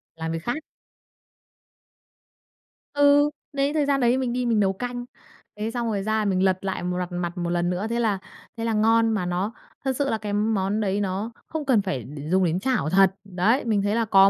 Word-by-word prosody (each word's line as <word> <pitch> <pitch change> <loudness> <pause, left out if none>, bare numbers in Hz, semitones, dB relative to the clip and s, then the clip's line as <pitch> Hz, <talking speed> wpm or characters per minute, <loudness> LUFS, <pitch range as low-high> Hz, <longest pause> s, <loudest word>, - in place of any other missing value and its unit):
Làm 160 0 -4
việc 165 - -2
khác. 300 - -2 2.3
Ừ, 285 0 +5 0.2
đấy, 280 +1 +1
thời 300 -2 +2
gian 280 -1 +2
đấy 245 +1 +4
mình 255 -2 -1
đi 250 0 -1
mình 230 -3 +2
nấu 195 -2 +3
canh. 245 +4 -5 0.5
Thế 215 +2 -3
xong 240 -1 -2
rồi 205 -3 -1
ra 215 +1 0
mình 190 -2 +1
lật 190 -1 +3
lại 190 -2 -2
m 180 0 -1
rặt 180 0 -3
mặt 175 0 -3
1 175 -1 -2
lần 175 0 +1
nữa, 180 +4 -1
thế 235 +1 0
là 215 -5 +1 0.4
thế 230 - -2
là 225 - 0
ngon, 225 +1 +4
mà 205 -5 0
nó 180 +5 -1 0.3
thật 265 - +1
sự 280 +1 0
là 225 - +1
cái 210 -1 -4
món 210 -1 +1
đấy 200 0 0
nó 200 +3 -2 0.2
không 315 -2 -4
cần 250 -6 +4
phải 140 - -3
đ 145 +5 -9
dùng 190 0 +4
đến 170 +1 +1
chảo 250 - 0
thật. 190 +2 +4
Đấy, 200 +7 +1
mình 215 -3 +2
thấy 205 +2 0
là 230 -1 +1
có 195 -2 +6
210 Hz, 225 wpm, -25 LUFS, 185-240 Hz, 2.3 s, có